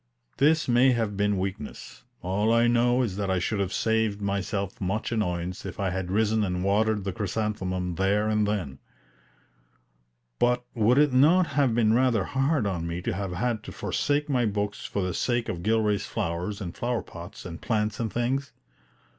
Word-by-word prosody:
This 155 +3 +3
may 125 +1 +5
have 110 -4 -1
been 105 0 +1
weakness; 95 +1 -5 0.2
all 100 +5 +1
I 115 0 +4
know 120 +1 +3
is 100 -5 -3
that 100 -2 -2
I 95 - +2
should 100 +4 -1
have 95 -2 -1
saved 110 -2 0
myself 100 0 -2
much 95 +5 -2
annoyance 90 -5 -2
if 95 +1 -7
I 95 -2 0
had 95 -1 -3
risen 110 +2 +2
and 90 -2 -1
watered 105 +1 +2
the 95 -1 -3
chrysanthemum 95 -3 -2
there 100 +4 +1
and 105 -1 +2
then. 90 -11 -3 1.6
But 125 0 +2
would 115 +3 +3
it 145 -2 +4
not 160 +8 +5
have 135 -5 +2
been 110 -2 +3
rather 120 -4 +3
hard 135 - 0
on 85 -4 -2
me 85 +1 -4
to 115 - -1
have 95 -1 -3
had 110 +4 -1
to - - -7
forsake 145 +1 -1
my 125 -5 +1
books 105 0 -3
for 100 - -2
the 90 -1 -2
sake 120 +3 0
of 85 - -4
Gilray's 105 0 +1
flowers 90 +5 -3
and 85 -3 -5
flower 120 -1 -1
pots 85 0 -10
and 85 -2 -7
plants 105 -2 -1
and 115 -3 -2
things? 135 +4 -1
105 Hz, 180 wpm, -26 LUFS, 95-120 Hz, 1.6 s, may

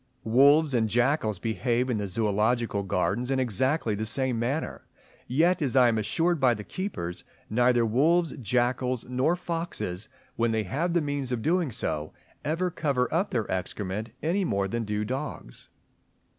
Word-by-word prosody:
Wolves 140 +6 +5
and 110 -3 +2
jackals 120 -2 +1
behave 120 +4 0
in 120 -4 -1
the 100 - -2
Zoological 105 +2 0
Gardens 100 +6 -1
in 135 -1 +1
exactly 130 - +1
the 105 +2 -2
same 130 0 0
manner, 135 +7 -3 0.4
yet, 165 +7 +2
as 135 -3 0
I 125 -2 +6
am 110 -1 +1
assured 165 +10 +1
by 125 -3 +4
the 105 - -7
keepers, 105 - -5 0.3
neither 120 +1 +3
wolves, 160 +9 +2
jackals, 125 +1 0
nor 130 +7 +1
foxes, 165 - -4 0.3
when 115 0 +2
they 110 -1 +1
have 155 - -1
the 170 - +3
means 145 -3 -2
of 120 -3 -2
doing 170 -4 +1
so, 80 -6 -3 0.3
ever 175 +4 -1
cover 140 -6 0
up 185 +5 +1
their 115 -4 -1
excrement, 95 +3 -3
any 180 +6 +1
more 100 - 0
than 115 +3 -2
do 105 0 -2
dogs. 130 - -6
125 Hz, 160 wpm, -27 LUFS, 110-150 Hz, 0.4 s, I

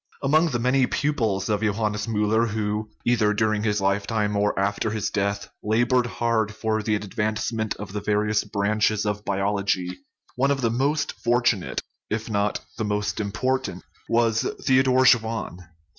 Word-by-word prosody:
Among 155 +4 +3
the 125 - -1
many 125 +2 +2
pupils 110 -10 0
of 105 -1 0
Johannes 105 0 -1
Miiller 110 +1 +2
who, 105 0 -2 0.2
either 110 -3 +2
during 110 -1 +1
his 105 -1 0
lifetime 105 +2 0
or 105 0 +1
after 100 +2 0
his 110 -1 -2
death, 100 0 -1
labored 120 +3 +2
hard 115 -2 0
for 110 0 -1
the 105 0 0
advancement 110 +1 -2
of 100 -2 -8
the 105 - -3
various 105 0 +1
branches 105 +1 0
of 105 0 -2
biology, 100 -2 -1 0.4
one 135 +2 +2
of 140 -1 0
the 115 -2 +1
most 140 +6 0
fortunate 120 -5 +1 0.3
if 110 +1 -3
not 100 0 0 0.2
the - - 0
most 105 -1 -1
im 100 -2 -2
portant 130 +4 -1 0.3
was 115 -1 +2 0.2
Theodor 130 0 +4
Schwann. 115 -6 +2
110 Hz, 155 wpm, -24 LUFS, 105-115 Hz, 0.4 s, Theodor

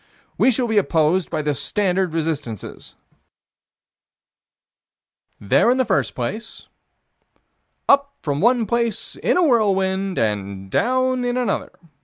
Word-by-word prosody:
We - - +3
shall 255 0 +1
be 220 -2 +3
opposed 170 -1 +1
by 155 -2 -2
the 150 0 0
standard 185 +5 -1
resistances: 150 - -5 2.4
There 105 - +3
in 250 - +3
the 260 - +2
first 140 - 0
place; 215 - -5 1.2
Up 280 0 +3
from 145 0 -2
one 240 0 +3
place, 235 +1 -2
in - - +1
a 360 - +4
whirlwind, 195 - +1
and 100 -3 -2
down 255 - +1
in 245 0 -1
another. 245 -5 -1
195 Hz, 120 wpm, -21 LUFS, 150-240 Hz, 2.4 s, a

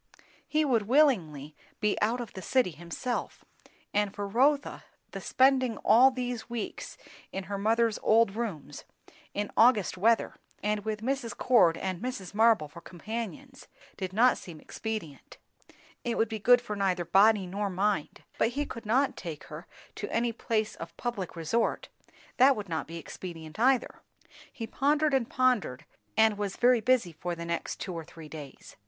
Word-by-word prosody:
He 310 0 +1
would 230 -7 +1
willingly 175 - +2 0.2
be 210 -1 +1
out 230 +4 +1
of 235 -3 -6
the 190 - -7
city 255 -3 +1
himself; 175 - -5 0.5
and 205 -1 +1
for 205 0 -3
Rotha, 275 +7 +1 0.3
the - - -6
spending 260 -3 +3
all 240 +5 +7
these 245 -2 -4
weeks 235 -2 -5 0.3
in 195 - -4
her 200 +1 -4
mother's 225 +1 +2
old 220 -2 +3
rooms, 215 -11 -5 0.5
in 205 0 -2
August 220 -6 +4
weather, 225 +4 +3 0.3
and 210 0 0
with 215 0 -4
Mrs. 260 -2 -2
Cord 215 -10 +4
and 185 -1 -4
Mrs. 245 -7 -5
Marble 220 -7 +4
for 170 +4 -13
companions, 230 +9 -7 0.3
did 185 -1 -4
not 240 +6 +4
seem 165 -4 -10
expedient. 215 -10 -6 0.7
It 240 -1 -2
would 225 - +1
be 220 -1 -4
good 245 +4 +5
for 215 -3 -5
neither 185 -3 0
body 200 +3 +4
nor 200 +3 -3
mind. 195 -3 -1 0.2
But - - +3
he 290 - 0
could 230 -5 -8
not 260 +5 +2
take 165 -5 -7
her 155 +3 -10 0.3
to 205 - -5
any 235 0 0
place 220 -1 -1
of - - -9
public 220 -8 -4
resort; 170 +8 -1 0.5
that 265 +1 +6
would 210 -2 -6
not 160 -1 -3
be 165 - -7
expedient 165 0 -9
either. 255 +1 +2 0.5
He 230 - -6
pondered 290 +5 +1
and 255 -3 +1
pondered, 250 - +1 0.3
and 220 -2 +4
was 200 -2 -3
very 245 -1 +4
busy 235 -6 +2
for 175 +2 -5
the 170 0 -6
next 170 0 -3
two 185 - -5
or 165 -1 -5
three 160 -1 -12
days. 145 -4 -10
215 Hz, 165 wpm, -29 LUFS, 185-245 Hz, 0.7 s, all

